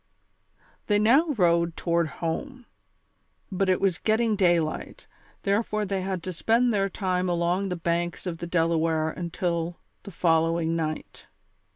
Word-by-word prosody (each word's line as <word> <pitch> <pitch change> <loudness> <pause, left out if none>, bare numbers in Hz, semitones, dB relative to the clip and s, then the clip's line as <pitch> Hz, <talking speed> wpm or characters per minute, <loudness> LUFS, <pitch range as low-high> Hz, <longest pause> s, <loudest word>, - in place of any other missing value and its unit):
They 205 - +3
now 250 +10 +4
rowed 170 -2 +2
toward 170 -1 +1
home; 245 - -5 0.9
but 190 0 0
it 185 - +3
was 190 -4 +1
getting 220 0 +1
day 175 -4 +4
light, 155 -1 -5 0.4
therefore 210 +1 0
they 195 -1 -2
had 185 -2 -3
to 185 - -4
spend 230 +7 +2
their 195 -1 +1
time 185 -1 -1
along 175 +3 0
the 180 - -2
banks 170 +1 -2
of 170 -3 -4
the 175 - -5
Delaware 165 -2 +1
until 170 0 -3 0.2
the - - -10
following 165 -1 +1
night. 155 -1 -4
175 Hz, 145 wpm, -26 LUFS, 170-200 Hz, 0.9 s, now